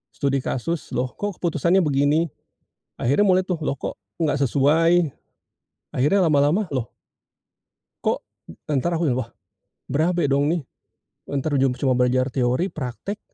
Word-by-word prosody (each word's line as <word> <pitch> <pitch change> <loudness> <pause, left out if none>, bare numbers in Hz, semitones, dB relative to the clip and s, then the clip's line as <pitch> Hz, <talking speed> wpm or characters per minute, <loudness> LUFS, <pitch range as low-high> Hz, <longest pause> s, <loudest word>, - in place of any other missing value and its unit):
studi 140 -1 0
kasus, 155 +6 -3
"Loh, 125 +1 -1
kok, 205 -2 -4
keputusannya 170 +2 +2
begini?" 145 +1 +2 0.7
Akhirnya 140 +12 +3
mulai, 185 -1 +3
tuh, 180 - 0
"Loh, 140 - 0
kok - - -4 0.2
nggak 160 -3 +1
sesuai?" 160 +6 +3 0.8
Akhirnya 150 +10 +2
lama-lama, 150 +7 +2
loh 125 -5 -3 1.1
kok - - 0 0.5
entar 165 +5 +1
aku 160 -4 +1
yang, 125 - 0
"Wah, 115 -2 -4 0.6
berabe, 170 +4 +1
dong, 140 +1 +2
nih. 170 -2 0 0.7
Entar 140 +2 -2
ujung 135 -2 +2
percuma 130 0 0
belajar 125 +1 +2
teori, 130 +9 0
praktik 155 - -5
145 Hz, 135 wpm, -23 LUFS, 130-170 Hz, 1.1 s, Akhirnya